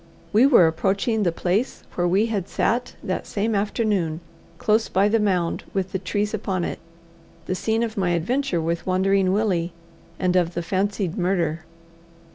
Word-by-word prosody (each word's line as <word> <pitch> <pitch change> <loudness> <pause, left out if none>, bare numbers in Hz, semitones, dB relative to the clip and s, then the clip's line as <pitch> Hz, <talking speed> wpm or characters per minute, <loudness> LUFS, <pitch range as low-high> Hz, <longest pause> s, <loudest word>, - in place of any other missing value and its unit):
We 230 +6 +6
were 240 - +7
approaching 195 +7 +1
the 180 -4 +2
place 185 +9 -1
where 175 0 0
we 195 +5 +3
had 205 -5 -2
sat 245 +2 0
that 185 - -3
same 220 +2 -1
afternoon, 200 -6 0 0.4
close 220 +4 +1
by 195 +2 +3
the 225 +2 +3
mound 185 -5 0
with 190 -1 -1
the 190 - -2
trees 205 +3 -2
upon 190 -4 -2
it, - - -4 0.7
the - - -2
scene 220 +4 0
of 225 -2 -4
my 185 -2 +1
adventure 195 - 0
with 165 +2 -2
Wandering 190 0 +2
Willie, 185 -5 0 0.4
and 180 -1 +1
of 175 -2 +2
the 175 - -2
fancied 195 0 -1
murder. 170 -3 0
190 Hz, 165 wpm, -23 LUFS, 175-215 Hz, 0.7 s, were